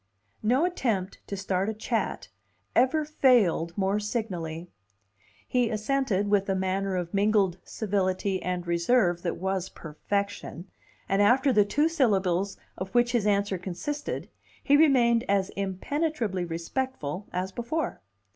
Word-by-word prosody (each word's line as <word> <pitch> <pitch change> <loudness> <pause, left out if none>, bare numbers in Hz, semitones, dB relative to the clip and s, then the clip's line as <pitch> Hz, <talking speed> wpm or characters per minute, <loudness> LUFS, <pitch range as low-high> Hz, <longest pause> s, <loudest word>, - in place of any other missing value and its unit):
No 255 +9 +3
attempt 225 - -1
to 200 - -4
start 190 +1 -1
a 220 - -3
chat 225 +1 -2 0.5
ever 280 +5 +3
failed 225 - +3
more 195 +1 +1
signally. 180 -7 -4 0.8
He 245 -2 +1
assented 215 -2 0
with 200 -1 +2
a 195 - +2
manner 190 +1 -1
of 175 -2 -3
mingled 200 -3 +2
civility 195 -2 -1
and 180 -1 -3
reserve 175 +1 +2
that 175 -2 -2
was 190 0 -2
perfection, 200 +2 -4 0.4
and 195 +1 +2
after 260 +6 +4
the 210 -2 +5
two 295 +9 +2
syllables 200 - +1 0.2
of 185 +1 -4
which 240 0 +4
his 230 -4 +1
answer 200 -2 +1
consisted, 190 +12 -4 0.4
he 285 - +4
remained 250 -6 +4
as 195 -1 +2
impenetrably 200 - -2
respectful 175 - -4
as 185 +1 -2
before. 240 +9 -3
200 Hz, 130 wpm, -27 LUFS, 185-240 Hz, 0.8 s, the